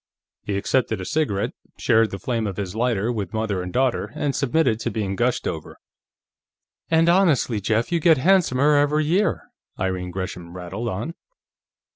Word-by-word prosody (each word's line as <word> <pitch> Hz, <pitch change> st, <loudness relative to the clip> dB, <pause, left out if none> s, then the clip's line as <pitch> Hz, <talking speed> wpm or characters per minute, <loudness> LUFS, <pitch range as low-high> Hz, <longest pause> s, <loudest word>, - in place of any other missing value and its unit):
He 100 Hz, -1 st, -3 dB
accepted 110 Hz, 0 st, 0 dB
a 95 Hz, -, -5 dB
cigarette, 120 Hz, -, 0 dB, 0.3 s
shared 110 Hz, 0 st, +3 dB
the 95 Hz, -, -5 dB
flame 115 Hz, +2 st, -2 dB
of 95 Hz, -, -5 dB
his 100 Hz, -1 st, -4 dB
lighter 115 Hz, -1 st, 0 dB
with 105 Hz, -3 st, -4 dB
mother 110 Hz, -4 st, -1 dB
and 90 Hz, 0 st, -5 dB
daughter, 130 Hz, +2 st, 0 dB
and 140 Hz, -2 st, -1 dB
submitted 140 Hz, -4 st, +1 dB
to 115 Hz, -, -2 dB
being 100 Hz, -3 st, -2 dB
gushed 120 Hz, +3 st, 0 dB
over. 80 Hz, -3 st, -5 dB, 0.6 s
"... -, -, -58 dB
and, 165 Hz, 0 st, +4 dB
honestly, 165 Hz, -, +3 dB
Jeff, 110 Hz, -, 0 dB
you 170 Hz, -, +2 dB
get 160 Hz, -1 st, +5 dB
handsomer 150 Hz, -3 st, +3 dB
every 150 Hz, +1 st, +2 dB
year," 185 Hz, +5 st, +1 dB, 0.4 s
Irene 95 Hz, -1 st, -2 dB
Gresham 90 Hz, -1 st, -6 dB
rattled 95 Hz, +6 st, -4 dB
on. 115 Hz, -, -4 dB
115 Hz, 165 wpm, -23 LUFS, 95-145 Hz, 0.6 s, get